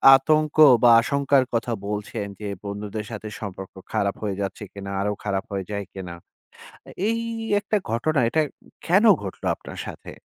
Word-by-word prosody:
আতঙ্ক 155 +3 +2 0.3
বা 120 - +8
আশঙ্কার 140 +1 +2
কথা 115 +1 0 0.2
বলছেন 105 +1 -3
যে, 105 - -5 0.2
"বন্ধুদের 105 +1 -5
সাথে 110 -1 -6
সম্পর্ক 95 -3 -7 0.2
খারাপ 100 -1 0
হয়ে 100 -2 -1
যাচ্ছে 100 +2 -4
কিনা? 100 -1 -7
আরো 105 +1 0
খারাপ 95 -2 -1
হয়ে 100 -1 -2
যায় 100 -1 -2
কিনা?" 90 -3 -7 0.7
আ - - -11 0.2
এই 230 +1 +1 0.4
একটা 205 +1 0
ঘটনা, 140 +6 +1
এটা 160 - +2 0.4
কেন 190 +5 +4 0.2
ঘটল 95 - -7
আপনার - - -10
সাথে? - - -9
105 Hz, 160 wpm, -24 LUFS, 100-140 Hz, 0.7 s, বা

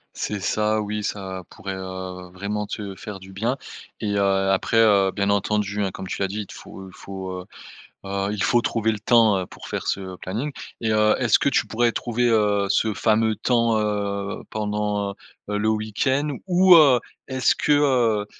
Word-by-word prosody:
C'est 105 - -3
ça 105 +2 +1
oui, 105 0 -3
ça 95 -2 -4
pourrait, 95 0 -6
heu, 95 -1 -7
vraiment 100 +3 -4
te 100 -1 -5
faire 105 0 -8
du 95 0 -13
bien. 115 +7 -1 0.4
Et 105 -2 -2
heu, - - +2 0.3
après, 95 +4 +1
heu, 100 -4 +5
bien 100 +1 0
entendu 105 0 0
hein 95 - 0
comme 95 - -7
tu 95 - -5
l'as 100 - +2
dit 105 +3 -4
il - - -6
te - - -12
faut 95 0 -11
il 95 - -14
faut, 95 -1 -7 0.7
heu, 100 +1 -2
il 105 -2 -3
faut 120 - +3
trouver 110 -1 0
le 105 - -6
temps, 110 -2 +4
heu, 90 - -3
pour - - -12
faire - - -4
ce 95 -1 -3
planning. 115 +13 -4 0.3
Et 110 -1 0
heu, 105 0 +4
est-ce 120 -4 +4
que - - +1
tu 140 - +1
pourrais 120 +1 +1
trouver, 120 +1 0
heu, 105 -3 +2
ce 110 +2 +2
fameux 110 +1 +2
temps, 115 -2 +2
heu, 100 -2 -2
pendant, 105 -1 -2 0.3
heu, 105 - -1
le 105 +1 0
week-end? 130 +7 0
Ou, 185 0 +7
heu, 135 -6 +6 0.3
est-ce 130 -2 +2
que, 150 - +1
heu, 125 -8 +3
105 Hz, 190 wpm, -23 LUFS, 100-115 Hz, 0.7 s, Ou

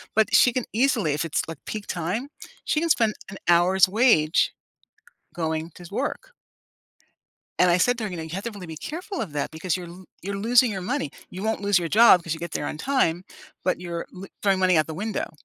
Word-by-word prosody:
But 220 0 +2
she 245 - +6
can 255 - -1
easily 230 - +2
if 150 +3 -1
it's, 160 - 0
like, 165 - -7
peak 215 -2 -6
time, 180 - -3 0.3
she 300 - 0
can 335 +1 -1
spend 225 -8 +3 0.2
an 195 - -8
hour's 180 +3 +5
wage 195 -8 +3 0.8
going 160 -1 -2
to - - -13
s 175 - -11
work. 270 - -4 1.3
And 180 - +5
I 175 - +4
said 245 +6 +2
to 225 - -3
her, 210 - -3
"You 180 - -6
know, 160 - -5
you 160 - -8
have 195 +2 -4
to 235 - -3
really 200 -4 -9
be 160 -1 -7
careful 355 - -5
of 180 -9 -5
that 145 -1 -2
because 160 +2 -2
you're 175 -1 -8
lo 180 +2 -12 0.2
you're 200 +1 -4
losing 235 +3 +4
your 190 -2 -4
money. 190 - -2 0.2
You 185 +2 -7
won't 220 -2 -1
lose 200 -2 +3
your 170 -1 -3
job, 210 -5 +7
'cause 165 - -2
you 160 - -7
get 170 - -6
there - - -3
on - - -5
time, 180 - +1 0.4
but 185 - 0
you're 170 -1 -5
lo 190 +1 -10
throwing 195 -2 +2
money 185 -2 +4
out 155 - +2
the 160 - -5
window." 210 +6 -3
185 Hz, 235 wpm, -24 LUFS, 170-225 Hz, 1.3 s, job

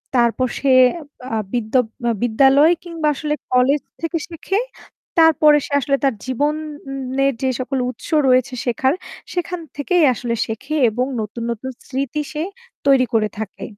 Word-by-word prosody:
তারপর 240 +1 +2
সে 280 - 0 0.6
আ - - +1 0.2
বিদ্য 225 -3 -2 0.5
বিদ্যালয় 270 +6 +5
কিংবা 335 -3 -3
আসলে 300 +2 -2 0.2
কলেজ 265 +3 +3 0.2
থেকে 330 +1 -1
শেখে। 350 +4 -2 0.6
তারপরে 310 -2 +6
সে - - -11
আসলে 275 0 +1
তার 270 -2 +3
জীবনের 275 -1 -2
যে 265 - +1
সকল 270 +1 -2
উৎস 250 - -9 0.2
রয়েছে 255 0 +3
শেখার 260 +2 +1 0.4
সেখান 355 0 -2 0.2
থেকেই 335 +4 +2
আসলে 235 0 -3
শেখে 265 +7 -4
এবং 245 +4 -1 0.2
নতুন, 220 +2 -5
নতুন 235 +3 -5 0.2
স্মৃতি 275 +3 -2
সে 305 - -3 0.4
তৈরি 270 -2 +5
করে 215 -1 +3
থাকে। 220 -3 -6
270 Hz, 140 wpm, -20 LUFS, 250-300 Hz, 0.6 s, তারপরে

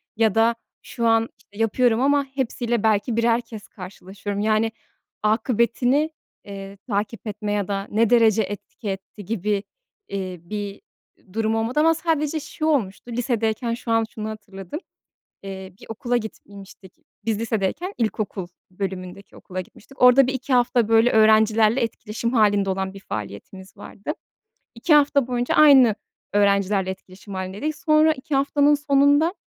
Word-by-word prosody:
ya 220 -2 +2
da 230 +1 +4 0.3
şu 235 -1 -2
an, 225 0 +3
işte, 205 - -21
yapıyorum 225 +1 +2
ama 285 +1 +3
hepsiyle 240 -4 -2
belki 220 +2 +2
birer 230 0 +3
kez 220 -3 -11
karşılaşıyorum, 195 +2 -7
yani, 215 +1 +2 0.5
akıbetini, 240 +6 +2 0.4
eee, 195 0 -8
takip 210 +1 -3
etme 210 0 -4
ya 205 -2 -1
da 195 0 -3
ne 220 +1 +2
derece 225 -3 +5
etki 205 +2 -7
etti 195 +1 -7
gibi, 205 -1 -1 0.4
iii, 185 -3 -6
bir 205 -1 -5 0.5
durum 220 0 0
olmadı 225 +5 0
ama 325 +2 +5
sadece 320 -2 -1
şu 305 +1 -5
olmuştu, 240 -6 -1
lisedeyken 230 -1 -1
şu 235 0 -5
an 225 0 +3
şunu 215 0 -6
hatırladım. 200 - -8 0.6
Eee, 190 -1 -8
bir - - -13
okula 240 +2 -1
gitmiştik. 200 -4 -9 0.3
Biz 225 -2 -1
lisedeyken 230 - -2
ilkokul 215 -4 -2 0.2
bölümündeki 185 0 -6
okula 185 0 -6
gitmiştik. 255 +8 -12
Orada 250 +1 +7
1-2 260 +1 -3
hafta, 245 -2 +3
böyle, 225 +2 +5
öğrencilerle 220 +2 +4
etkileşim 230 0 -3
hâlinde 205 -4 +3
olan 190 0 -2
bir 195 - -10
faaliyetimiz 150 - -8
vardı. 210 +9 -6 0.6
2 265 +7 +2
hafta 285 -3 +4
boyunca 245 -1 -1
aynı 270 -7 +7 0.4
öğrencilerle 200 -1 +2
etkileşim 190 +1 -10
hâlindeydik. 195 +12 -4
Sonra 310 0 +4
2 280 +1 -5
haftanın 285 +1 +3
sonunda 290 +4 +3
220 Hz, 140 wpm, -23 LUFS, 200-250 Hz, 0.6 s, Orada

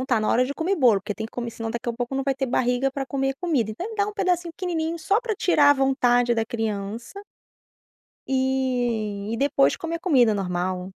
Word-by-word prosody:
não - - -2
tá 240 -5 +2
na 215 - -1
hora 250 - +3
de 275 - -3
comer 355 +6 0
bolo, 245 - +4
porque 205 +1 -5
tem 220 - -5
que - - -19
comer, 235 -1 -4
senão 225 -1 -5
daqui 235 +1 -4
a 235 - 0
pouco 245 +2 -4
não 270 - -1
vai 275 -1 +1
ter 270 0 -2
barriga 250 +2 +1
pra 270 0 -4
comer 270 0 -1
comida, 280 - 0
então 370 - -6
dá 405 -1 +1
um - - -5
pedacinho 360 -4 0
pequenininho 335 -2 -3
só 395 +8 +1
pra 480 -3 -2
tirar 290 -7 +4
a - - +6
vontade 245 -3 +2
da 225 - 0
criança 225 - -4 1.1
e 245 -6 -1
e 230 - -1
depois 275 +1 +2
comer 335 0 -4
comida 255 - +4
normal. 180 -1 -2
255 Hz, 220 wpm, -24 LUFS, 225-300 Hz, 1.1 s, a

